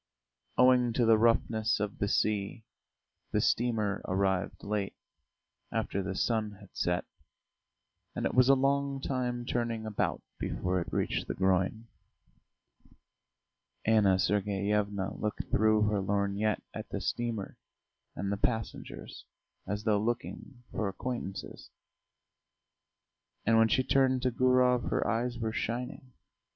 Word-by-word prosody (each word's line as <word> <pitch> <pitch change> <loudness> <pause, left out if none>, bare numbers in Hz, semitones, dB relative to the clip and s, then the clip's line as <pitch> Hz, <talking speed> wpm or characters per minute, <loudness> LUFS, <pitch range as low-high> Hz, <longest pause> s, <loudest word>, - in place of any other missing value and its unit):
Owing 125 -1 +5
to 120 0 +2
the 115 0 +6
roughness 110 -1 +2
of 105 -1 -3
the 100 - +1
sea, 105 +2 0 0.7
the - - +2
steamer 110 -4 +1
arrived 95 0 0
late, 100 -1 -2 0.8
after 100 - -1
the 95 0 -4
sun 110 -1 0
had 100 -1 -16
set, 90 0 0 1.1
and - - -2
it - - 0
was 125 +1 +5
a 135 - +8
long 140 +1 +1
time 125 -3 -2
turning 115 -2 -2
about 110 -2 -1 0.2
before 90 0 -1
it - - -6
reached - - -1
the - - -3
groyne. 95 +3 +1 2.0
Anna 105 -4 +4
Sergeyevna 100 0 0
looked 105 -1 -2
through 110 0 +4
her 105 -1 +1
lorgnette 100 +2 0
at - - -7
the - - -3
steamer 115 -4 -3 0.6
and 100 +2 -2
the 100 - -1
passengers 100 - -4 0.4
as 105 +1 -3
though 105 -2 +3
looking 120 +2 -4
for 110 - -1
acquaintances, 100 -1 -5 1.8
and 115 - +4
when 115 0 +6
she 130 +3 +2
turned 130 -1 +2
to 130 - +2
Gurov 125 0 +3
her - - 0
eyes 120 +1 0
were 110 -2 -2
shining. 125 +3 -4
110 Hz, 125 wpm, -30 LUFS, 100-120 Hz, 2.0 s, a